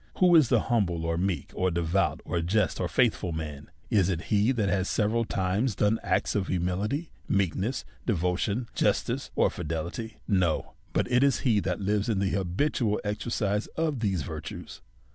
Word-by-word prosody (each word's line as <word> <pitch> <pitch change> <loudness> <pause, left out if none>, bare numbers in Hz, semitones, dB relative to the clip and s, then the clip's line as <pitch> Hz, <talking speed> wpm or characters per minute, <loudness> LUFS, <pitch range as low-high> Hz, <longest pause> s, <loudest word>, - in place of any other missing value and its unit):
Who 180 -2 +5
is 155 -7 +6
the - - +4
humble, 90 -9 0
or 85 0 0
meek, 85 -4 -1
or 95 0 +1
devout, 85 +3 0
or 85 - -1
just, 95 +1 +1
or - - 0
faithful 90 - +1
man? 75 -3 -6 0.2
Is 95 -4 +3
it 85 -3 -1
he 105 +4 +4
that 110 -6 0
has 95 0 0
se 110 - +1
veral 115 +2 +1
times 95 +5 0
done 105 +4 +2
acts - - 0
of 100 -2 0
humility, 95 - -1 0.2
meekness, 100 +5 0 0.2
devotion, 100 +4 0
justice, - - 0
or - - +3
fidelity? 85 +7 -4
No, 90 -6 +1 0.2
but - - 0
it 125 0 +4
is 140 -3 +3
he 115 -6 +3
that 90 0 -2
lives 105 +3 0
in 110 - +1
the 95 0 +1
habitual 105 - 0
exercise 105 0 -1
of 155 -5 0
these 95 -8 0
virtues. 80 0 -7
100 Hz, 175 wpm, -28 LUFS, 90-110 Hz, 0.2 s, is